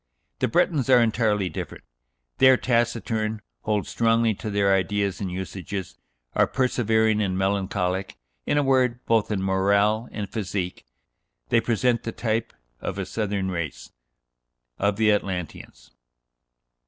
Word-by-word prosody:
The - - +2
Bretons 145 -1 +1
are 125 -2 +7
entirely 110 -4 +2
different: - - -6 0.6
they 130 - +7
are 130 - +6
taciturn, 115 -3 0 0.2
hold 105 -1 0
strongly 115 -1 +2
to 110 +2 -6
their 100 -1 +2
ideas 100 +1 0
and 95 -2 -3
usages, 95 +1 -6 0.3
are - - +3
persevering 110 -4 +1
and 95 -3 -1
melancholic; 95 -1 -1 0.3
in - - +2
a 145 - +3
word, 125 -2 +2
both 115 -2 +2
in 100 -3 -1
morale 100 +4 +2
and 105 -2 -4
physique 90 - -4 0.6
they 115 - +4
present 120 +1 +1
the 115 - -4
type 115 0 -2 0.3
of - - -4
a - - -2
southern 100 -3 -2
race 75 -9 -5 0.9
of 100 0 +1
the 110 0 +3
Atlanteans." 90 -11 -4
105 Hz, 135 wpm, -25 LUFS, 95-115 Hz, 0.9 s, are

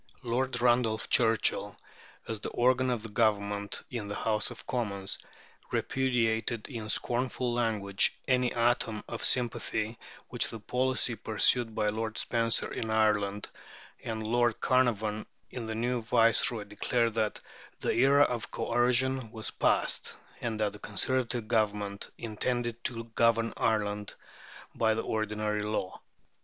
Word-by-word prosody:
Lord 125 +1 -1
Randolph 120 -2 +2
Churchill, 110 -3 +2 0.5
as 110 -2 -3
the - - -5
organ 130 +1 +2
of 120 -3 -1
the 115 - -7
Government 105 -2 0
in 115 -5 -4
the 100 - -4
House 105 -2 0
of - - -11
Commons, 100 -6 -3 0.5
repudiated 115 -3 0
in 115 -5 -6
scornful 125 +1 -1
language 105 -5 +2
any 125 -1 +2
atom 115 -2 +1
of 120 - -5
sympathy 115 -2 +1 0.3
with - - 0
the 115 - -7
policy 125 +2 0
pursued 115 +1 +2
by 105 - +1
Lord 110 +1 -3
Spencer 115 -1 +2
in 110 - -3
Ireland; 105 -2 +1 0.5
and 110 -1 -4
Lord 120 +2 +2
Carnarvon, 110 -4 +1 0.2
the 115 -3 -4
new 120 +2 -1
Viceroy, 115 -1 +3
declared 115 +3 0
that 110 -1 -1 0.4
"the - - +1
era 140 +4 +5
of 120 -7 -2
coercion" 125 +1 +1
was 110 -2 -5
past, - - 0 0.3
and 115 -2 -3
that 105 -1 +1
the 105 - -11
Conservative 120 +2 0
Government 105 -2 -1
intended 120 +1 -2
to 115 -2 -2
govern 115 0 +1
Ireland 105 -2 -1 0.6
by 110 -1 +2
the 115 - -2
ordinary 105 -1 -1
law. 105 -3 -3
115 Hz, 130 wpm, -30 LUFS, 105-120 Hz, 0.6 s, era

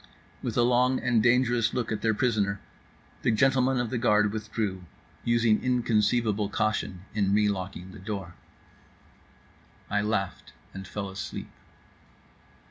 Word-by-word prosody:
With - - -3
a 120 - +5
long 125 +1 +3
and 120 -3 +2
dangerous 120 -1 +3
look 120 -2 -1
at 110 - -2
their 110 -1 +2
prisoner, 105 -4 +1 0.6
the - - +1
gentlemen 130 +2 +3
of 120 -2 -1
the 125 - -1
guard 105 -3 +3
withdrew, 105 -4 -3 0.4
using 115 -2 +2
inconceivable 110 -3 +1
caution 105 -4 -1
in 105 -2 +1
the 105 0 +3
relocking 95 -2 -3
of 95 - -12
the 100 - -11
door. 95 -3 -5 1.6
I 105 0 +2
laughed 105 -2 -2 0.2
and 95 -1 -8
fell 100 -1 -5
asleep. 85 -6 -6
110 Hz, 135 wpm, -27 LUFS, 100-120 Hz, 1.6 s, a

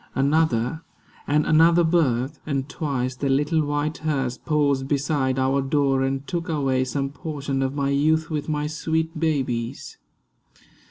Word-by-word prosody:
Another, 140 -1 +1 0.5
and 150 +1 +2
another 165 +2 +5
birth, 150 -4 +1
and 140 -2 -1
twice 130 -4 -2
The 140 +2 -2
little 150 +4 +2
white 145 +1 -2
hearse 135 -5 -1
paused 140 -3 0
beside 140 -2 0
our 135 +1 +2
door 135 -1 +1
And 135 +1 -1
took 170 +1 -4
away 135 -4 +1
some 135 +1 -2
portion 140 -3 -4
of 135 +1 -1
my 140 -1 0
youth 155 +3 +1
With 150 0 -3
my 150 -1 -1
sweet 160 +1 -2
babies. 130 -7 -2
145 Hz, 145 wpm, -23 LUFS, 135-155 Hz, 0.5 s, another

